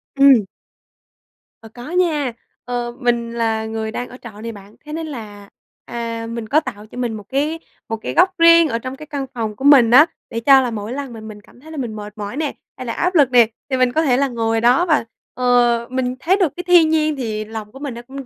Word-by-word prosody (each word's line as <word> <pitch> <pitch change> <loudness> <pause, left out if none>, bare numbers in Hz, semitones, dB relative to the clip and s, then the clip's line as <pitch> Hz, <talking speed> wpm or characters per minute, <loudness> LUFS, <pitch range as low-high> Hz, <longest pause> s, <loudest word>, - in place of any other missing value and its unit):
Ừm. 275 -7 +6 1.2
Ờ, 225 - -11
có 245 +5 -10
nha. 315 -8 +1 0.3
Ờ, 245 -1 -3
mình 235 -2 0
là 225 -1 -1
người 220 0 -4
đang 245 +2 -5
ở 250 - -11
trọ 215 -3 -11
nè 230 +1 -5
bạn, 205 -1 -14
thế 300 - -8
nên 320 0 -4
là, 210 -7 -9 0.4
à, 230 -1 -5
mình 230 -1 -5
có 295 - +3
tạo 215 -8 -8
cho 245 - -13
mình 240 -3 -2
một 210 - -7
cái 300 +4 -1 0.3
một 225 - -2
cái - - -5
góc 370 +1 +3
riêng 335 -1 +7
ở 230 - -1
trong 255 +2 -6
cái 305 - -11
căn 285 -3 -4
phòng 220 -4 -3
của 265 - -10
mình 260 -5 +7
á 285 +5 +8 0.2
để 230 - -3
cho 270 +2 +6
là 245 - -2
mỗi 215 +2 -5
lần 275 -3 -5
mà 225 - -9
mình 215 -1 -10
cảm 240 - -21
thấy 315 +4 -14
là 315 - -8
mình 235 -5 -4
mệt 210 -1 -8
mỏi 205 +4 -6
nè, 305 -2 -2 0.2
hay 255 - -7
là 230 - -3
áp 360 +1 -1
lực 285 -6 +4
nè, 240 -3 +6 0.2
thì 260 - 0
mình 255 -1 +2
có 315 - +1
thể 260 -6 +2
là 275 +1 +2
ngồi 225 -2 -1
đó 250 +9 +4
và, 310 -8 +2 0.3
ờ, 240 -1 +2
mình 255 -1 -2
thấy 360 +7 +2
được 365 -7 +1
cái 355 - -5
thiên 345 -3 +6
nhiên 310 -1 +1
thì 215 -5 -4
lòng 220 -1 -8
của 270 - -12
mình 285 -3 -5
nó 235 - -8
cũng 265 +2 -9
245 Hz, 250 wpm, -19 LUFS, 225-285 Hz, 1.2 s, á